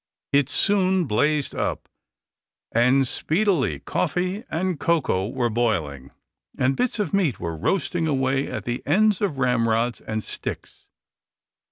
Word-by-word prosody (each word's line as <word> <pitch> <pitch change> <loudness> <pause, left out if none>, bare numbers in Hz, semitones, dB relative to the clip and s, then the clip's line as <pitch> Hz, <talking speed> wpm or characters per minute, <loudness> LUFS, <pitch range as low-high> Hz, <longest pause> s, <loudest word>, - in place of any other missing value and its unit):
It 140 -1 +3
soon 190 -2 +2
blazed 145 +5 +1
up, - - -3 0.8
and 125 +3 +3
speedily 155 - +1
coffee 185 +4 -1
and 180 -1 -1
cocoa 140 - +1
were 120 -1 -1
boiling, 80 - -1 0.5
and 130 +1 +2
bits 250 - -1
of 210 -1 -2
meat 170 - +1
were 85 -2 -4
roasting 170 - 0
away 135 -1 +1
at - - -5
the 120 +1 -3
ends 210 +6 +3
of 185 -9 -1
ramrods 120 -2 +1
and 110 0 -4
sticks. - - -7
135 Hz, 130 wpm, -24 LUFS, 115-180 Hz, 0.8 s, It